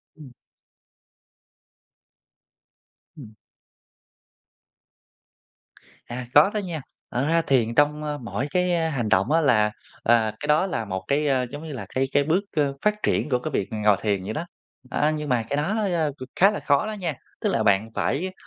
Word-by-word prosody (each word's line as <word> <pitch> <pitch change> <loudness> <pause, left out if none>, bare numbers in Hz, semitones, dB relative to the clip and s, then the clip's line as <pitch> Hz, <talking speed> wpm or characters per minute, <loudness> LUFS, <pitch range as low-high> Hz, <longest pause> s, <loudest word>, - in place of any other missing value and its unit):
Ừm. 145 -5 -13 2.9
Ừm. 110 -7 -11 2.7
À, 125 +1 -6
có 150 +7 +7
đó 215 - 0
nha, 170 -7 -4 0.3
thật 125 +3 0
ra 165 0 +3
thiền 120 -6 +1
trong, 150 +1 +2
ơ, 150 -1 -3
mỗi 125 +2 -4
cái 175 -3 +1
hành 120 -7 -2
động 95 +10 +2
á 165 - +4
là, 110 -7 +3 0.3
à, 115 -2 +3
cái 145 - -5
đó 155 +6 +3
là 115 -11 -3
một 95 -1 -4
cái, 145 +2 +1
ơ, 130 -2 +2
giống 145 +2 -7
như 155 -3 -6
là, 125 - -6
cái 135 +1 +2
cái 140 - +3
bước, 165 +6 +2
ơ, 145 -2 +1
phát 210 0 0
triển - - +1
của 125 -2 +2
cái 155 +5 -5
việc 100 -7 -1
ngồi 105 -2 +3
thiền 100 -3 0
vậy 110 +3 -4
đó. 165 - -3 0.4
A, 150 +5 +1
nhưng 150 -1 -4
mà 120 -3 +2
cái 140 - -1
đó, 170 +9 0 0.2
a, 155 -3 +1
c 130 -2 -10
khá 195 +3 +5
là 210 - -4
khó 140 +4 +2
đó 215 - -3
nha, 180 -6 -3 0.3
tức - - +1
là - - +1
bạn 100 +2 +3
phải 185 +7 -1
145 Hz, 180 wpm, -24 LUFS, 120-160 Hz, 2.9 s, có